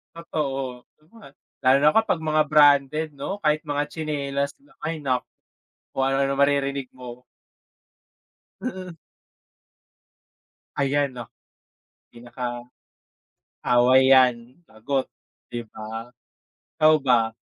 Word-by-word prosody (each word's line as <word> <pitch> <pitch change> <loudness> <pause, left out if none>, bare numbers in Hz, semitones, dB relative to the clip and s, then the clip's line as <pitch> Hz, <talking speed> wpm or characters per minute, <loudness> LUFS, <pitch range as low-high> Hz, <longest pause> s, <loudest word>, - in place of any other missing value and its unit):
Totoo, 135 -7 -4 0.8
lalo 130 +1 +6
na 150 - +5
kapag 225 -6 +2
mga 155 -1 +2
branded 150 0 +4
'no? 195 +9 -5
Kahit 155 0 +1
mga 145 -1 -1
tsinelas 140 -3 -3
lang, 145 0 -25
ay 160 0 -3
naku 130 -3 -1 0.7
kung 135 - 0
ano-ano 135 0 +1
na 140 - -2
maririnig 140 -1 +1
mo. 125 -1 -10 1.4
Mm. 185 -8 -6 1.8
Ayan 140 0 0
oh. 115 - -9 0.9
Pinaka, 120 0 -6 1.0
away 130 +2 +5
yan 125 0 +3
lagot 130 +5 -3 0.4
di 120 -1 -5
ba, 110 +2 -8 0.6
ikaw 155 0 +5
ba? 120 -5 +2
140 Hz, 100 wpm, -24 LUFS, 125-150 Hz, 1.8 s, lalo